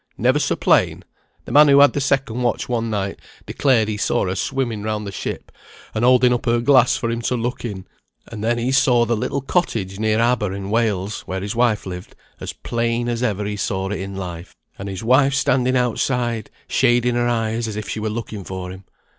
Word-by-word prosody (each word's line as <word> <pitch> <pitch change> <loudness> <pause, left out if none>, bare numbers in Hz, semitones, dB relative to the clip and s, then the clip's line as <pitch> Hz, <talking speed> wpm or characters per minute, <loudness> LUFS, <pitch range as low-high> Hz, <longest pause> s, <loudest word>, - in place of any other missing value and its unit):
"Never - - +2
so - - 0
plain; - - +2 0.4
the - - -8
man 150 +1 +7
who 140 0 +6
had 145 0 +6
the 145 - -1
second 135 -3 0
watch 120 +2 -1
one 115 -2 -1
night 100 -2 -3 0.3
declared 125 -6 +2
he 105 -1 -3
saw 105 - 0
her 90 - -1
swimming 120 +2 -2
round 105 0 -3
the 100 - -5
ship, - - -6 0.4
and 110 - -1
holding 125 0 +5
up 120 - -3
her 120 0 +3
glass 130 0 +4
for 115 - -2
him 115 0 -3
to 125 - -1
look 120 +1 -3
in; 100 -6 -5 0.4
and 110 -2 -7
then 120 +1 +1
he 120 +2 -1
saw 125 -3 +4
the 120 0 0
little 135 +6 -2
cottage 110 - -1
near 110 0 +1
Aber 115 -5 +1
in 100 0 -5
Wales 105 -3 0
(where 95 0 -3
his 100 +3 -4
wife 115 -3 +1
lived) 90 -1 -8 0.2
as - - -5
plain 115 0 -2
as 120 -1 -2
ever 105 -4 -1
he 105 0 -3
saw 95 -2 -2
it 105 - -3
in 95 +1 -6
life, 90 -2 -7 0.2
and 100 +1 -5
his 95 +3 -6
wife 135 +4 +4
standing 130 -1 +2
outside, 120 -2 -1 0.2
shading 120 0 +2
her 120 0 +1
eyes 115 -1 -1
as 110 - -5
if 105 -1 -5
she - - -4
were 110 0 -2
looking 110 -2 -5
for 90 0 -6
him. 95 +1 -11
115 Hz, 215 wpm, -21 LUFS, 105-125 Hz, 0.4 s, man